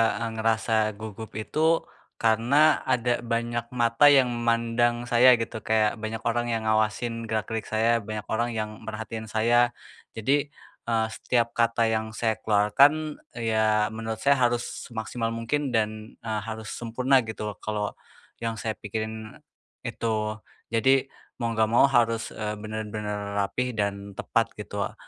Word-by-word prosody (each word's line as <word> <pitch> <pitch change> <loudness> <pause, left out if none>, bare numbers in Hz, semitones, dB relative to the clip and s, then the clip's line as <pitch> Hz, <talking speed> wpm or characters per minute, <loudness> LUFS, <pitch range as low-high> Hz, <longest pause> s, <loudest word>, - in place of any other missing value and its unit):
eee, 115 +1 -2
ngerasa 110 0 +1 0.2
gugup 110 +1 -8
itu, 110 +7 -4 0.6
karena 115 +4 +1 0.3
ada 125 -1 +1
banyak 120 0 -2
mata 120 +4 +4
yang 135 -3 +6 0.2
mandang 115 +1 +2 0.2
saya, 120 +1 +6
gitu. 115 -1 -4
Kayak 110 -1 +2
banyak 110 0 -5
orang 120 0 0
yang 115 -1 -1
ngawasin 110 +2 0
gerak-gerik 110 0 -2
saya, 110 +1 +1 0.2
banyak 110 -1 -4
orang 120 +2 +1
yang 110 -1 -2 0.2
merhatiin 110 0 -6
saya. 120 +2 +3 0.4
Jadi, 140 +6 +1 0.4
eee, 115 -1 +2
setiap 115 0 0
kata 115 0 +2
yang 110 0 -2
saya 110 -1 0
keluarkan, 140 +9 +3 0.2
ya 110 -2 +1
menurut 110 0 -5
saya 140 -1 +4
harus 120 -1 +2 0.2
semaksimal 115 0 -3
mungkin 140 +6 -1
dan, 110 0 -2
eee, 110 -1 -2
harus 110 0 -6
sempurna 125 +3 +2
gitu, 105 -1 -5
kalau 105 -1 -2 0.5
yang 115 -1 -2
saya 110 0 -3
pikirin 110 +1 -5 0.5
itu. 110 -1 -2 0.3
Jadi, 135 +4 +3 0.3
mau 115 -1 -1
nggak 110 -1 +3
mau 135 +3 +6
harus, 115 -3 +2
eee, 105 -1 -4
bener-bener 105 -1 -4
rapih 125 +5 -1
dan 100 -1 -3
tepat - - -1
gitu - - -8
o - - -7
115 Hz, 140 wpm, -26 LUFS, 110-120 Hz, 0.6 s, yang